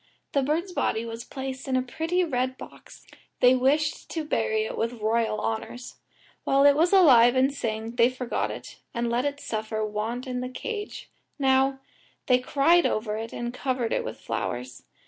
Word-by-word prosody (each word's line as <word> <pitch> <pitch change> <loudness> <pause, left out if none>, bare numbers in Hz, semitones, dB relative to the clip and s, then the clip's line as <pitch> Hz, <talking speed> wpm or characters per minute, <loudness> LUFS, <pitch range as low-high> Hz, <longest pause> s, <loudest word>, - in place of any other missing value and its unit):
The 280 - +2
bird's 320 +7 -1
body 230 -9 -1
was 230 0 -6
placed 265 0 -6
in 265 - 0
a 255 - +2
pretty 325 +8 -1
red 260 -4 -1
box; - - -13 0.3
they 250 0 +6
wished 285 +4 +1
to 320 -2 -3
bury 435 +7 0
it - - -4
with 230 - -1
royal 225 -1 0
honours. 240 +3 -4 0.5
While 275 +1 +3
it 285 0 +7
was 330 +4 +3
alive 260 -11 +7
and 265 +2 +3
sang 220 -3 -3
they 235 0 +5
forgot 255 -1 -2
it, - - -9 0.2
and 235 0 -1
let 245 +3 +1
it 285 0 -2
suffer 220 -3 -3
want 220 +4 -3
in 250 -1 -3
the 250 - -4
cage; 420 - -6 0.3
now, 270 -1 +2 0.4
they 250 -1 +4
cried 290 +7 +3
over 215 -1 -2
it 225 +1 -5
and 240 0 -4
covered 250 -3 -1
it - - 0
with - - -6
flowers. 125 +1 -4
255 Hz, 180 wpm, -26 LUFS, 230-285 Hz, 0.5 s, it